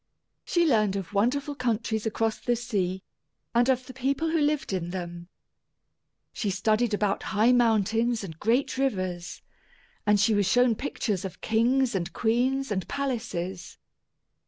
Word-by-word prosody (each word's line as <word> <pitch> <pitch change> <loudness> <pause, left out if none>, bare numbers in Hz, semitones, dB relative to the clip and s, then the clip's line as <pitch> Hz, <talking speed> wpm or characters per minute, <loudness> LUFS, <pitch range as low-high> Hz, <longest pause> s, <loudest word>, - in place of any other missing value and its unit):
She 345 -1 +2
learned 215 -9 +2
of 195 -1 -5
wonderful 270 +8 +1
countries 230 -4 -1
across 220 0 -1
the 240 - 0
sea, 195 -6 -2 0.5
and 240 +2 +3
of 255 -1 +1
the 255 - -10
people 275 +5 -1
who 325 -1 +2
lived 295 -7 0
in 175 -2 -2
them. 175 -1 -6 1.1
She 210 - -2
studied 215 +3 +1
about 205 -1 0 0.2
high 225 +4 +5
mountains 230 -1 +2
and 160 -4 -8
great 245 +4 +1
rivers, 185 -9 -2 0.6
and 210 -1 +3
she 220 +2 +3
was 205 -2 +2
shown 245 +3 +4
pictures 215 -6 -2
of 190 - -7
kings 240 +3 +2
and 180 -3 -2
queens 250 +3 +1
and 190 -3 -2
palaces. 195 -10 -4
225 Hz, 145 wpm, -27 LUFS, 195-250 Hz, 1.1 s, high